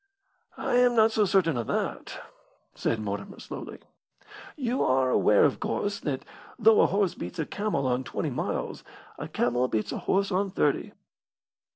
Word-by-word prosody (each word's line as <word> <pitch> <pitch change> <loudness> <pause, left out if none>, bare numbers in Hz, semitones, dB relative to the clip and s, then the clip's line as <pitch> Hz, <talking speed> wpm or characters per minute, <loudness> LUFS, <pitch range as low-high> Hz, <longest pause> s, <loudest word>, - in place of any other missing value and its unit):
"I 245 - 0
am 245 -1 +4
not 220 0 +5
so 215 -1 +2
certain 180 -7 +2
of 115 - -3
that," - - -3 0.5
said 115 - -1
Mortimer, 100 -1 -5
slowly. - - -8 0.8
"You 255 -3 -1
are 130 0 +2
aware, 105 -4 +5
of 140 - +1
course, 205 0 -2
that 135 -4 -3 0.3
though 220 0 +6
a - - +5
horse 195 -1 +1
beats 90 - -7
a 160 - -1
camel 205 -9 -2
on 125 0 0
twenty - - -3
miles, - - -3 0.4
a - - -5
camel 125 +1 0
beats 110 -3 -2
a - - -3
horse 200 +1 0
on 195 +2 +1
thirty." 150 -6 0
165 Hz, 165 wpm, -27 LUFS, 125-205 Hz, 0.8 s, though